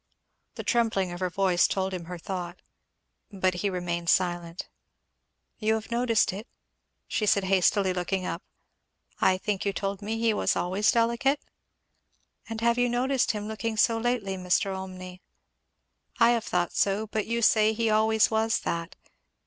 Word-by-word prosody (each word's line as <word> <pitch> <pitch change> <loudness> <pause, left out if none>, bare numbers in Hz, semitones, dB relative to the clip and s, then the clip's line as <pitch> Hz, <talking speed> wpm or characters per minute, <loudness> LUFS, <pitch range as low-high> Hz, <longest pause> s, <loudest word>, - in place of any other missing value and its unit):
The - - -6
trembling 220 -6 +1
of 175 - -6
her 185 -1 -1
voice 185 -1 +2
told 190 0 -2
him 175 -2 -5
her 180 +1 -7
thought. 175 0 -6 0.7
But 185 -2 0
he 205 - +1
remained 175 -2 -3
silent. 175 -2 0 0.9
"You 220 0 +2
have 220 +1 -6
noticed 235 -4 +2
it?" 210 +6 -7 0.6
she 210 - -1
said 200 -1 +3
hastily, 190 0 +2
looking 180 +1 -2
up. - - -4 0.8
"I 185 - +3
think 200 0 -2
you 200 - 0
have 195 - -5
told 195 0 -3
me 220 +2 -3
he 225 -1 +2
always - - +1
was 190 +4 +1
delicate?" 235 +5 +2 1.1
"And 225 0 -4
you 235 - +2
have 235 0 +3
noticed 245 +1 +1
him 210 0 -5
looking 220 +1 -3
so 225 +1 +3
lately, 225 -5 -1
Mr. 185 +2 0
Olmney?" 185 -1 -8 1.0
"I 230 0 +6
have 235 -2 0
thought 175 -1 -1
so, 200 +2 +1
but 215 -1 -3
you 235 +1 -1
say 215 0 +5
he 225 0 0
always 220 +1 +3
was 220 0 +1
that. 170 +1 -3
205 Hz, 165 wpm, -27 LUFS, 185-225 Hz, 1.1 s, I